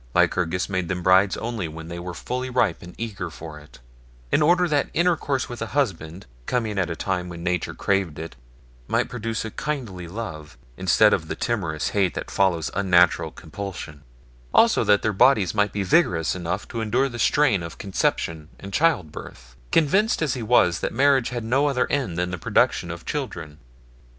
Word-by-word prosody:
Lycurgus 90 0 +2
made 95 -3 -2
them 90 0 -3
brides 95 +2 +4
only 115 -6 -3
when 80 +1 -9
they 85 +1 -6
were 90 0 -6
fully 125 +5 -4
ripe 115 -9 +1
and 90 +1 -11
eager 100 -6 -4
for 80 -1 -9
it, 75 0 -17 0.5
in - - +3
order 175 +3 +4
that 145 -3 +1
intercourse 165 -6 +1
with 120 -2 -8
a 115 +5 -4
husband, 90 - -2 0.2
coming 110 -5 -1
at 90 -2 0
a 85 - -3
time 90 0 -2
when 85 -1 -8
nature 90 -1 -1
craved 95 -6 0
it, 80 +1 -7 0.5
might - - 0
produce 115 -2 -3
a 110 - -5
kindly 115 - -4
love, 85 -6 -7 0.2
instead 95 - +4
of 80 - -1
the - - -4
timorous 95 -10 -2
hate 95 -4 +1
that - - -5
follows 90 -5 +1
unnatural 90 -3 +3
compulsion; 85 -5 -8 0.5
also - - +5
that 105 -1 +3
their 110 - +1
bodies 105 -4 +4
might 105 -1 +1
be 100 -1 -2
vigorous 90 - +2
enough 90 +2 -4
to 115 - -4
en 110 - -3
dure 130 +5 +2
the 120 -3 -7
strain 140 - +3
of 85 -1 -7
conception 80 -5 -2
and 100 0 -9
child 150 - +2
birth, - - -11 0.2
con 165 - +4
vinced 205 +4 +2
as 145 -5 0
he 125 - -4
was 105 -7 +3
that - - -2
marriage 135 0 +3
had 120 -2 -4
no 130 +6 +2
other 135 -3 +1
end 130 -12 -1
than 90 +1 -1
the 90 - -4
production - - +1
of - - -7
children. 75 -1 -5
100 Hz, 190 wpm, -24 LUFS, 85-120 Hz, 0.5 s, also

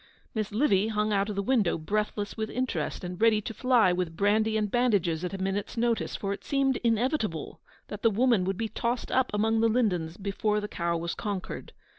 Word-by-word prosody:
Miss 215 -2 -2
Livy 210 -3 +2
hung 215 -1 0
out 200 +1 +1
of 210 - -3
the 200 - -1
window, 215 -7 +2
breathless 205 +4 -2
with 220 -1 -3
interest, 235 - -2
and 180 +2 -6
ready 225 -2 +5
to 225 - -6
fly 240 -7 +3
with 175 -2 -3
brandy 215 +2 +2
and 210 -2 -1
bandages 200 -10 +1
at 180 - -2
a - - -4
minute's 195 +3 -3
notice, 235 0 0
for 200 -1 -2
it - - -9
seemed 270 -2 +1
inevitable 230 - -1 0.3
that 205 - -7
the 230 - +5
woman 230 -2 +3
would 190 0 -1
be 225 - -1
tossed 235 +2 -2
up 260 -1 +2
among 220 +2 +1
the 230 - +4
lindens 180 -9 0
before 210 +1 -1
the 210 - -4
cow 170 -3 -1
was 170 +1 -3
conquered. 205 -4 -5
210 Hz, 205 wpm, -28 LUFS, 195-230 Hz, 0.3 s, ready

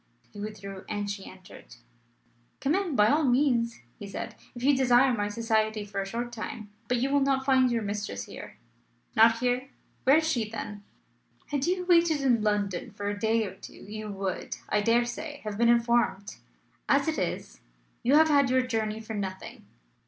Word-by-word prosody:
He 205 - -10
withdrew, 200 -2 -7
and 205 -1 -2
she 200 -1 -7
entered. 185 -9 -14 0.8
"Come 275 +2 +1
in, 370 -5 0
by 210 -2 +5
all 305 +6 +3
means," 245 - +2 0.2
he 205 - -7
said, 195 - -6 0.2
"if 240 - -7
you 280 +1 +5
desire 255 0 +4
my 205 -3 -1
society 220 -1 0
for 200 -1 -3
a 195 - -5
short 235 +4 -4
time. 215 -2 -7 0.2
But 250 - +1
you 265 +3 0
will 285 - +4
not 270 -1 +1
find 260 -2 +4
your 230 -2 0
mistress 205 - -4
here." - - -10 0.6
"Not 225 +1 +6
here! 250 +2 -1 0.4
Where 270 +4 +7
is 320 0 +1
she, 235 -9 0
then?" 210 -2 -6 0.7
"Had 285 0 -1
you 360 0 0
waited 335 -3 +4
in 245 -5 +3
London 205 -1 -1
for 205 -1 -4
a 205 0 -4
day 220 +1 +2
or 190 - -6
two 190 - -12
you 215 +1 -8
would, 195 -2 -4
I 210 - +2
dare 230 +3 +3
say, 290 +4 -6
have 210 -1 -5
been 235 0 +4
informed. 235 -4 +2 0.5
As - - +3
it - - 0
is, - - -4 0.4
you 260 +4 +3
have 315 +1 +6
had 280 -3 +4
your 255 0 +3
journey 220 -3 -2
for 220 0 -7
nothing." 190 -2 -6
230 Hz, 190 wpm, -28 LUFS, 205-265 Hz, 0.8 s, Where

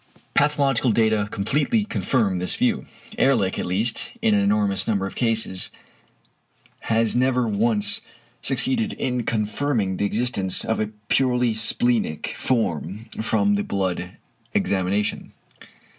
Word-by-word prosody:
Pathological 140 -4 +2
data 110 -1 +2
completely 150 - 0
confirm 110 - 0
this 90 - 0
view. 235 -3 0 0.3
Ehrlich 115 -9 +2
at - - -3
least, 105 +6 +1
in 110 - +2
an 100 - +3
enormous 100 -1 +1
number 100 -4 0
of 95 - -6
cases, 110 -6 +1 1.1
has 115 0 +1
never 125 -1 +2
once 105 0 +1 0.4
succeeded 225 - +2
in 125 -1 -2
confirming 110 -2 -1
the 100 - 0
existence 105 -3 0
of 110 - -1
a 110 - 0 0.2
purely 125 -3 +2
splenic 110 -5 0
form 110 - -2
from 205 - +1
the 205 0 0
blood 95 - -3 0.4
examination. 100 +2 -1
110 Hz, 120 wpm, -23 LUFS, 100-130 Hz, 1.1 s, an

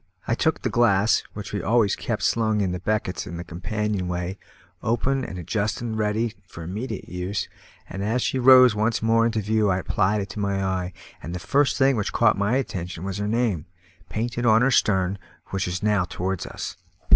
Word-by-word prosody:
I - - +1
took - - 0
the - - +1
glass, 105 -3 +3
which 105 -1 -7
we 100 - -1
always 110 -1 +2
kept - - -3
slung 110 -2 +2
in 90 -2 0
beckets 90 0 -2
in 85 - -6
the 85 - -5
companion 100 +3 -3
way, 90 +2 -3 0.4
open 130 +4 0
and 95 - -6
adjusted 105 +5 -2
ready 110 +1 0
for 85 - -9
immediate 105 +5 -5
use, 90 +2 -3 0.4
and 95 - -5
as 115 +4 0
she 130 - 0
rose 130 -1 +8
once 110 +2 0
more 115 +1 +4
into 110 -2 -1
view 105 0 +1
I 90 - +2
applied 100 +2 +1
it 100 - -5
to 105 - -7
my 100 -1 0
eye, 95 -1 -2 0.3
and 85 +3 -6
the - - -4
first 140 +9 +2
thing 135 -2 +4
which 105 - -2
caught 115 -2 +4
my 100 +4 +1
attention 90 -9 -4
was 100 +1 -4
her 105 - -1
name, 110 -8 0 0.4
painted 120 +2 -2
on 110 0 +5
her 135 - +3
stern, 95 -4 +2 0.3
which 95 -1 -2
was 90 +3 -3
now 105 -4 +2
towards 95 0 -3
us. - - -6
105 Hz, 195 wpm, -24 LUFS, 95-115 Hz, 0.4 s, rose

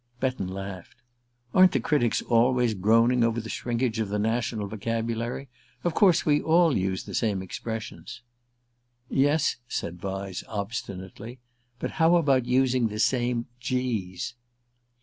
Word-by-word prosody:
Betton 130 -8 -1
laughed. 95 -1 -7 0.6
"Aren't 185 -1 +6
the 135 - +2
critics 120 -3 +1
always 120 0 +3
groaning 115 +5 +3
over 115 0 +1
the 110 0 -7
shrinkage 120 -1 -1
of 110 -3 -1
the 105 - -1
national 110 0 -1
vocabulary? 115 +4 -3 0.4
Of 175 - 0
course 185 -2 +4
we 150 -1 +3
all 165 -1 +4
use 95 0 -1
the - - -9
same 100 -5 0
expressions." 115 +4 -6 0.9
"Yes," 145 +3 +2
said 85 -5 -4
Vyse 95 0 -4
obstinately. 100 +1 -6 0.4
"But - - -4
how 165 +2 +6
about 135 -7 +3
using 125 -1 +3
the 105 -1 -6
same 120 +1 +1
g's?" 120 -8 -2
115 Hz, 130 wpm, -26 LUFS, 105-130 Hz, 0.9 s, Aren't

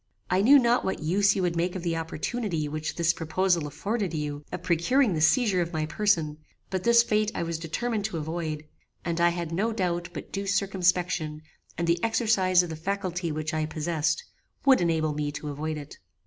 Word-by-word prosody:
I 185 +1 +3
knew 270 +8 +8
not 240 -1 +3
what 190 - -2
use 195 +5 +3
you 190 - 0
would 175 -1 0
make 175 +2 0
of 185 - -4
the 170 -2 0
opportunity 165 +1 -2
which 155 +1 -4
this 170 0 +2
proposal 170 0 0
afforded 200 - -2
you 150 -1 -3
of - - -5
procuring 190 - +2
the 155 - -1
seizure 195 - +3
of 170 0 -3
my 155 -1 0
person; 160 -5 0 0.3
but 190 -1 -2
this 235 0 +6
fate 215 -1 +1
I - - -1
was 165 -1 -3
determined 210 +6 -2
to 195 -5 -3
avoid, 155 -1 -4 0.4
and 170 -1 -1
I 175 - +6
had 170 -1 -4
no 205 +7 0
doubt 175 -5 -1
but 150 -4 -8
due 195 0 -3
circumspection, 180 -5 0 0.3
and 170 - 0
the 170 +1 +1
exercise 210 -6 +3
of 175 - -5
the - - -4
faculty 180 0 -2
which 155 +2 -3
I 155 -1 0
possessed, 160 - -1 0.4
would 265 -6 +6
enable 160 -3 +1
me 145 0 -2
to 150 0 -5
avoid 155 +2 -3
it. 145 -1 -10
170 Hz, 200 wpm, -27 LUFS, 155-200 Hz, 0.4 s, knew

